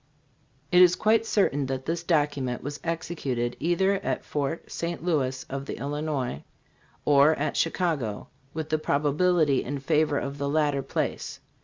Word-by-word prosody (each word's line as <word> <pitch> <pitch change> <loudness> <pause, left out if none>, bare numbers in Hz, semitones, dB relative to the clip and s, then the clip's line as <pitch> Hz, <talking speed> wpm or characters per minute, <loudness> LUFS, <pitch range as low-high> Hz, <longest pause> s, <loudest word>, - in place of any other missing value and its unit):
"It 180 - +7
is 180 0 +7
quite 225 +3 +2
certain 145 -11 +1
that 130 0 -3
this 165 +1 -1
document 145 -7 0
was 145 +1 -5
executed 155 -8 -2
either 175 +4 +2
at - - -2
Fort 145 +2 -3
St. 170 -1 -4
Louis 130 -6 0
of 135 0 -5
the - - -5
Illinois 145 - -3 0.6
or 145 +2 +5
at 150 +1 -2
Chicago, 160 - -1 0.2
with 160 0 -5
the 155 - +1
probability 150 0 +2
in 140 +3 -3
favor 150 +1 +1
of 140 +1 -4
the 140 0 -1
latter 145 -2 +1
place. - - -3
150 Hz, 150 wpm, -26 LUFS, 140-165 Hz, 0.6 s, It